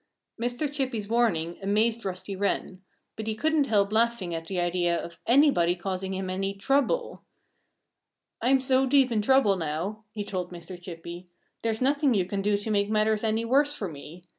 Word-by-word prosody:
Mr. 245 +5 -1
Chippy's 255 -7 -2
warning 195 -8 +1
amazed 220 +4 +1
Rusty 185 +1 -4
Wren. 190 -1 -2 0.3
But 220 0 -6
he 220 - -1
couldn't 310 +4 +2
help 205 -2 +2
laughing 225 -5 +1
at 165 0 -5
the 185 0 -2
idea 175 0 +1
of 170 0 -8
anybody 240 - +4
causing 190 +1 -4
him 190 0 -3
any 195 +1 -2
trouble. 280 - 0 1.2
"I'm 260 +3 +3
so 260 0 +2
deep 265 -1 +4
in 220 -2 +1
trouble 235 -4 +4
now," 175 +7 -3
he 210 -1 -4
told 185 -3 -4
Mr. 175 +1 -9
Chippy, 175 0 -8 0.3
"there's 225 +1 -1
nothing 280 -1 +3
you 190 -3 +2
can 195 +2 -3
do 205 +1 +2
to 205 +2 -4
make 200 -1 +1
matters 215 0 +1
any 220 +1 0
worse 285 +4 +3
for 200 - -3
me. 160 +2 -10
205 Hz, 175 wpm, -27 LUFS, 185-240 Hz, 1.2 s, anybody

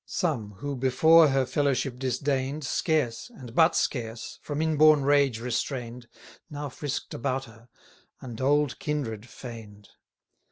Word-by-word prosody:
Some, 125 - -2
who 140 +8 -5
before 155 +6 +5
her 135 -1 +2
fellowship 135 -2 -1
disdain'd, 135 +2 -1
Scarce, 140 - -1
and 130 - -12
but 160 +4 +4
scarce, 115 -3 -3
from 145 0 -4
in 160 0 +1
born 155 -1 +6
rage 140 -4 +3
restrain'd, 120 0 -4 0.4
Now 145 -1 -5
frisk'd 140 +1 -5
about 130 +3 -2
her, 115 +1 -17 0.5
and 120 -2 -8
old 145 0 +2
kindred 120 -7 -3
feign'd. 110 -5 -11
135 Hz, 130 wpm, -27 LUFS, 120-145 Hz, 0.5 s, born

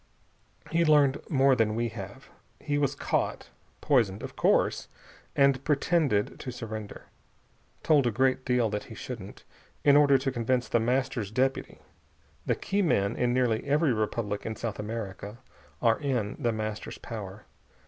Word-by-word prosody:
He'd 165 -1 +2
learned 145 -2 +4
more 135 -3 +4
than 110 -3 +1
we 120 +1 -1
have. 110 +4 -9 0.3
He 145 -1 -1
was 140 -1 0
caught - - -2 0.3
poisoned, 115 -8 +2
of - - -7
course - - +2 0.5
and 140 -1 +3
pretended 145 -7 +1
to 130 - -5
surrender. 110 -3 -7 0.8
Told 145 -5 +4
a - - +1
great 130 +3 +1
deal 125 -3 +2
that 105 -1 -3
he 110 - -11
shouldn't, 105 -4 -8 0.4
in 145 -1 +6
order 145 -2 +6
to 135 +1 -2
convince 125 0 0
The 120 - +2
Master's 125 -2 -1
deputy. 130 +4 -1 0.7
The - - +2
key 200 +1 -1
men 100 - +1
in 120 -1 +1
nearly 120 -3 +1
every 145 -1 +2
republic 105 -1 -2
in 110 - -4
South 110 -2 -5
America 105 -1 -6 0.5
are 115 -1 +3
in 125 -8 -1
The 120 - +1
Master's 110 -1 -5
power. 105 -2 -8
120 Hz, 150 wpm, -28 LUFS, 110-140 Hz, 0.8 s, in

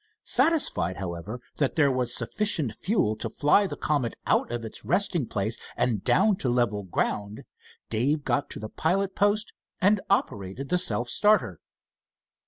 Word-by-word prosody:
Satisfied, 280 - +1
however, 95 +5 -5 0.2
that 140 -3 0
there 145 -4 +4
was 125 -2 0
sufficient 180 - 0
fuel 110 - 0
to 115 - -3
fly 150 - +3
the - - -5
Comet 140 -6 -1
out - - +1
of 120 -1 -3
its 110 - -8
resting 170 - 0
place 110 +3 -1 0.2
and 120 -5 0
down 200 0 +3
to 130 - -1
level 120 -4 +1
ground, 100 +2 -3 0.5
Dave 140 +7 +1
got 145 - 0
to - - -5
the 110 - -5
pilot 190 - 0
post 205 +1 +1 0.3
and 200 +1 +3
operated 120 - -1
the 180 +1 +3
self 120 -4 +1
starter. 205 - +2
130 Hz, 155 wpm, -26 LUFS, -, 0.5 s, there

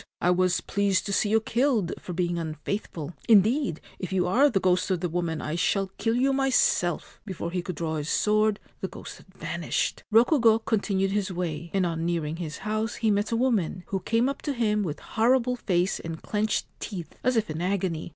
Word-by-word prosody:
I 175 - +3
was 180 0 +2
pleased 200 -2 0
to 200 - -2
see 205 - +2
you 220 +1 +4
killed 230 -4 +1
for - - -8
being 175 -1 -1
unfaithful. 160 0 -4 0.2
Indeed, 215 - +4 0.2
if 185 - -5
you 185 -2 +1
are 255 +11 +4
the 210 -7 +1
ghost 180 +1 +2
of 185 -2 +1
the 180 - -1
woman 170 -1 -1
1 155 +2 -3
shall 195 +2 +1
kill 225 0 +1
you 270 +2 +2
myself! 265 -10 +1
' - - -41
Before 170 -3 -4
he 180 0 -1
could 180 0 -5
draw 160 0 -2
his 150 +1 -3
sword 215 0 +2 0.2
the - - -3
ghost - - -9
had - - -19
vanished. - - -2
Rokugo 230 0 +5
continued 195 -3 +1
his 200 -1 -1
way, 170 -2 -3
and 195 -2 +1
on 165 -1 -2
nearing 165 -2 -1
his 160 -3 -5
house 215 +1 -1
he 220 -2 +1
met 205 +2 0
a - - +1
woman, 210 -8 0
who 195 - -1
came 230 +6 +1
up 275 - -3
to 290 - -2
him 215 -4 +1
with 155 -6 -3
horrible 250 +2 +2
face 185 -5 0
and 165 -1 -6
clenched 215 0 -1
teeth, 180 -6 -6
as 255 +1 +2
if 220 - +1
in 155 +2 -4
agony. 180 -3 -1
195 Hz, 210 wpm, -26 LUFS, 175-225 Hz, 0.2 s, Rokugo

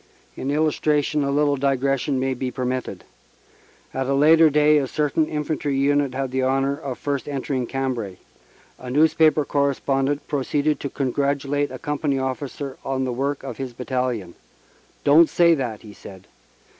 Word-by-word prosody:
In 135 - -4
illustration 150 0 +1
a 140 - -1
little 145 0 +2
digression 135 0 0
may 130 0 0
be 130 0 -3
permitted. 125 0 -4 0.9
At 130 0 -2
a 140 - +1
later 160 +3 +6
day 150 +1 +4
a 135 - -2
certain 150 +2 0
infantry 150 -2 -2
unit 140 -1 +1
had 135 -1 -2
the 130 0 0
honor 135 +1 +1
of 140 -4 -6
first 145 0 -3
entering 135 -2 -2
Cambrai. 125 -8 -3 0.6
A 125 - -8
newspaper 155 +2 +3
correspondent 140 0 0
proceeded 145 +1 0
to 140 - -4
congratulate 140 +1 -1
a 130 - -7
com 150 0 -4
pany 140 -4 0
officer 135 +1 -4
on 135 -1 -2
the 125 -1 -2
work 135 +3 -2
of 135 - -6
his 130 -2 -5
battalion. 125 -7 -3 0.7
"Don 150 +4 +7
t - - -13
say 170 0 +4
that," 125 -8 -3
he 105 -2 -11
said. 95 -2 -12
140 Hz, 160 wpm, -23 LUFS, 130-145 Hz, 0.9 s, Don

